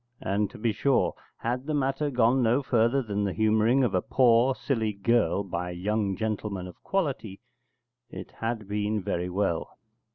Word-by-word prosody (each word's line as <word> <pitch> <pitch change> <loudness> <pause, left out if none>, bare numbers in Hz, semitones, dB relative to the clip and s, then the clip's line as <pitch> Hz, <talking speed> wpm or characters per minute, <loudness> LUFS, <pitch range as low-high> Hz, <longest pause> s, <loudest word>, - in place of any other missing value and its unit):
And, 100 +1 0
to - - -12
be 115 +1 0
sure, 135 +5 +1 0.2
had 125 +4 -3
the 155 - 0
matter 135 +1 0
gone 125 0 +3
no 120 +4 +2
further 120 +2 +2
than 105 -2 -2
the 100 -2 -1
humouring 110 +4 +3
of 115 -5 +1
a 90 - +2
poor 125 +2 +3
silly 110 -7 -1
girl 100 -2 +1
by 90 -2 -4
a - - -5
young 100 +2 -1
gentleman 105 -3 -3
of 90 - -12
quality, 130 - -2 0.7
it - - -9
had 115 -2 -4
been 105 0 -1
very 90 -2 -2
well. 90 -3 -2
110 Hz, 170 wpm, -27 LUFS, 100-125 Hz, 0.7 s, gone